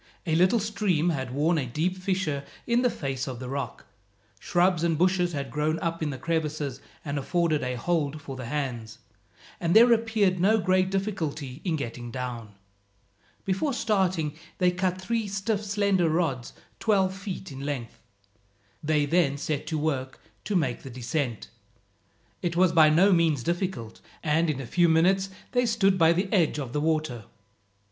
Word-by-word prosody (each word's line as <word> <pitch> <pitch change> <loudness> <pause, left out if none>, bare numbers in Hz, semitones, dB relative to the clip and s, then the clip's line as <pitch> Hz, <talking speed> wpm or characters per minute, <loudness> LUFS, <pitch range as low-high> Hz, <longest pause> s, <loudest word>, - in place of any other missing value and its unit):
A 160 - 0
little 185 +8 +4
stream 200 -6 0
had 135 -6 -2
worn 155 +6 +1
a 130 - -2
deep 160 +9 -1
fissure 185 -6 -2 0.2
in 235 +1 +2
the 250 - +3
face 135 - -4
of 130 -2 -5
the 130 - -6
rock. 140 +2 -5 0.5
Shrubs 175 -2 +2
and 165 -2 +1
bushes 180 0 +2
had 140 -4 -4
grown 150 +3 0
up 165 -1 -3
in 155 - 0
the 135 - -4
crevices 150 -4 -2 0.2
and 145 -1 -2
afforded 165 +1 +1
a 125 0 -2
hold 155 +2 -1
for 135 -2 -8
the 130 -2 -6
hands, 120 -5 -4 0.6
and 170 +1 0
there 235 +2 +8
appeared 220 -5 +1
no 210 +5 +4
great 185 -1 +2
difficulty 160 -9 -3
in 175 -4 0
getting 120 -4 -5
down. 120 -4 -6 0.9
Before 195 +10 0
starting 185 -10 0 0.2
they 180 -1 +3
cut 185 0 -1
three 225 +3 -1
stiff 200 +2 -2
slender 200 -4 +1
rods 155 -7 -1 0.3
twelve 195 -4 +2
feet 195 -2 -6
in 135 - -8
length. 135 -5 -5 0.8
They 150 -1 +1
then 145 -2 +2
set 145 0 -3
to 160 - -1
work 135 -4 -2 0.3
to 205 - -1
make 135 -9 0
the 135 - -9
descent. 125 - -3 0.9
It 170 -1 -2
was 180 0 +4
by 160 -2 +6
no 185 +6 +5
means 160 -7 +2
difficult, 170 - -3 0.2
and 160 +2 +2
in 145 -3 -1
a 135 - -5
few 175 +7 +3
minutes 190 +4 +3 0.2
they 245 -1 +2
stood 195 -4 +2
by 165 0 +6
the 185 +4 +1
edge 170 -7 +3
of 130 -4 -5
the 150 - 0
water. 155 -8 -1
165 Hz, 170 wpm, -27 LUFS, 140-190 Hz, 0.9 s, there